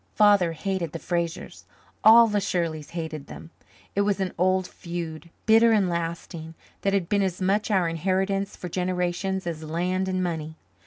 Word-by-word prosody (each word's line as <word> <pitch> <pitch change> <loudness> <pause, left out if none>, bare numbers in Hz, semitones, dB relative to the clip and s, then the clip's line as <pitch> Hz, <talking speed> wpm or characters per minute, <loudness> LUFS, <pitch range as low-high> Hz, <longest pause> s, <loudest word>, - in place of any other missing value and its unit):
Father 205 -5 +5
hated 175 -1 -3
the - - -3
Frasers, 170 -1 -3 0.4
all 230 +2 +9
the 210 -2 0
Shirleys 165 -6 -2
hated 155 -3 -5
them; 165 - -10 0.4
it 200 - +3
was 200 -1 +1
an 190 -2 -2
old 185 +1 +2
feud, 170 -2 -6 0.2
bitter 225 +1 +6
and 205 -4 +3
lasting, 165 -1 -4 0.3
that 195 - +1
had 195 -4 +1
been 200 +1 +2
as 185 -2 -1
much 200 +4 +1
our 190 -5 +2
inheritance 190 +4 -1
for 180 - -7
generations 180 +1 -1
as 165 -2 -4
land 180 +4 -1
and 185 0 -1
money. 160 -3 -3
180 Hz, 165 wpm, -25 LUFS, 165-195 Hz, 0.4 s, all